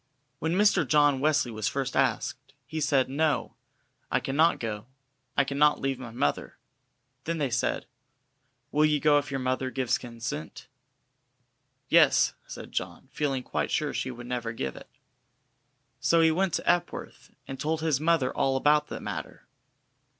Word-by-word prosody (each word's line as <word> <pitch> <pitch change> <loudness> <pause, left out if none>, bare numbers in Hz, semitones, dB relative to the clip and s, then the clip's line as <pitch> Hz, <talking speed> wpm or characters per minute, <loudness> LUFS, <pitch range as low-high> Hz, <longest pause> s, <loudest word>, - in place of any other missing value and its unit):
When 160 +1 -1
Mr. 205 +3 +4
John 145 0 +4
Wesley 145 -3 +2
was 110 -1 -2
first 135 -1 -2
asked, 135 0 -1
he 155 +5 -5
said: 135 -3 +2
"No, 150 +3 0 0.6
I - - +2
cannot 150 +5 +2
go, 110 -1 -5 0.5
I 140 - +5
cannot 140 +2 +2
leave 135 -1 -2
my 125 -2 -7
mother." 90 -11 -2 0.7
Then 165 0 -1
they 140 -5 -1
said: 125 - -1 0.9
"Will 150 - +3
you 150 -1 +3
go 145 0 +4
if 145 -2 -6
your 135 -1 -2
mother 130 0 -1
gives 125 -2 0
her - - -18
consent?" 115 -9 -6 1.2
"Yes," - - +5
said - - -9
John, - - -5
feeling 135 -4 -1
quite - - -2
sure 150 -1 -1
she 130 - -2
would 120 -1 -8
never 120 -2 -3
give 65 - -4
it. - - -12 1.1
So 165 0 +3
he 160 0 +5
went 185 +1 +1
to - - -4
Epworth 175 - -1 0.2
and 135 -1 -7
told 160 +1 -1
his 155 -4 +1
mother 155 -4 +1
all 135 0 +1
about 150 +2 +3
the - - -6
matter. - - -7
135 Hz, 160 wpm, -27 LUFS, 125-155 Hz, 1.2 s, I